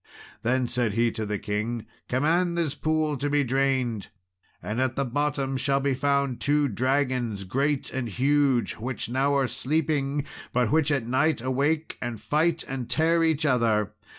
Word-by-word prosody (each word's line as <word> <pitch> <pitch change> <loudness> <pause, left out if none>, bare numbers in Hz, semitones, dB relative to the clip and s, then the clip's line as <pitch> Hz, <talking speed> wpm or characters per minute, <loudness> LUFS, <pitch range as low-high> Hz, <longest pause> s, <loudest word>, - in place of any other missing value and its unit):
Then 130 +2 +1
said 120 -4 0
he 115 +1 +2
to 110 -2 -4
the 105 0 -1
king, 110 +3 -3 0.2
"Command 170 +7 +1
this 160 -5 0
pool 155 -1 0
to 145 +2 -2
be 145 0 +2
drained, 130 -5 0 0.5
and 110 +4 -3
at 130 -1 0
the 140 - 0
bottom 135 0 -1
shall 135 +1 +1
be 140 0 +1
found 140 -1 0
two 145 0 +2
dragons, 125 -3 0
great 135 +8 -1
and 130 -3 -2
huge, 135 +2 +2
which 120 +1 -4
now 135 +3 +1
are 135 -1 +3
sleeping, 145 +1 -1 0.3
but 120 -2 +2
which 155 -1 +3
at 135 -5 0
night 135 +6 +1
awake 140 +6 -1
and 120 -3 -4
fight 160 +5 +1
and 130 -3 -5
tear 165 +1 +3
each 160 -1 +1
other. 110 -6 +2
135 Hz, 165 wpm, -26 LUFS, 120-145 Hz, 0.5 s, are